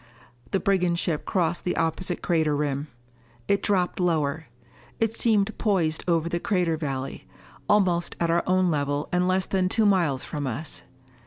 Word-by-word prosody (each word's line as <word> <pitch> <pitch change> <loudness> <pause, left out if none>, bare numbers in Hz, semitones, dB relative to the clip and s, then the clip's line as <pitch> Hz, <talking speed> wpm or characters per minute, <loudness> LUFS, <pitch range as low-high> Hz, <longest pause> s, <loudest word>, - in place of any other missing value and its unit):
The 195 - +1
brigand 180 -3 +1
ship 165 -3 -1
crossed 175 -2 0
the 180 - -1
opposite 165 +2 -1
crater 160 -4 +1
rim. 145 0 -1 0.6
It 200 - +2
dropped 185 -3 0
lower. 160 -3 0 0.5
It 225 -1 +1
seemed 220 -2 +2
poised 175 -8 +1
over 170 -2 +2
the 170 0 -1
crater 180 -6 +1
valley, 135 -4 -5 0.4
almost 180 -4 +2
at 170 -1 +1
our 170 +1 +3
own 185 -1 +3
level 145 -1 -1
and 180 0 +2
less 185 0 +1
than 185 -1 0
two 220 +2 +2
miles 170 -10 +2
from 145 -3 -4
us. 135 +5 -5
170 Hz, 160 wpm, -25 LUFS, 155-185 Hz, 0.6 s, our